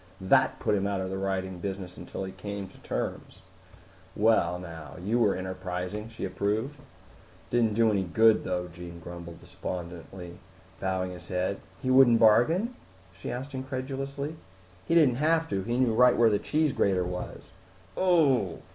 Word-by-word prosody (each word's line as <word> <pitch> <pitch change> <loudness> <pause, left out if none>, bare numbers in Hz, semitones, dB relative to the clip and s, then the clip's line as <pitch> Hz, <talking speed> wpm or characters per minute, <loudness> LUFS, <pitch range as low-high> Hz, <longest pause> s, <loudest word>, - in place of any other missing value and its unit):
That 95 -1 +3
put - - 0
him 100 -1 +1
out 100 -1 -1
of 95 0 -3
the 95 - -3
writing 95 -1 -2
business 95 -1 -5
until - - -6
he 95 - -5
came 100 +1 -6
to - - -18
terms." - - -5 0.7
"Well, 110 -4 +3
now. 80 -4 -9
You 105 +7 0
were 105 -4 +3
enterprising!" 95 +3 -4
she 115 -3 -5
approved. 110 +9 -2
"It - - -15 0.7
didn't 115 -3 +2
do 115 -1 +4
any 100 -2 +1
good 110 +5 +4
though," 90 -1 -2
Jean 85 0 -10
grumbled 85 0 -9
despondently, 90 0 -7 0.4
bowing 95 -1 -1
his 90 -1 -10
head. 90 +2 -1 0.2
"He 130 - +1
wouldn't 130 -3 +7
bargain?" 155 - +4 0.4
she 95 - -7
asked 135 +3 -5
incredulously. 135 +3 -4 0.5
"He 165 - +2
didn't 140 -8 +5
have 160 +1 +3
to. 95 - -1
He 120 +5 -2
knew 125 -3 +3
right 125 +2 +5
where 115 -2 +5
the 105 - +2
cheese 150 +4 +1
grater 95 -2 +2
was." 90 0 -6 0.5
"Ooh!" 140 - +3
100 Hz, 165 wpm, -28 LUFS, 90-125 Hz, 0.7 s, wouldn't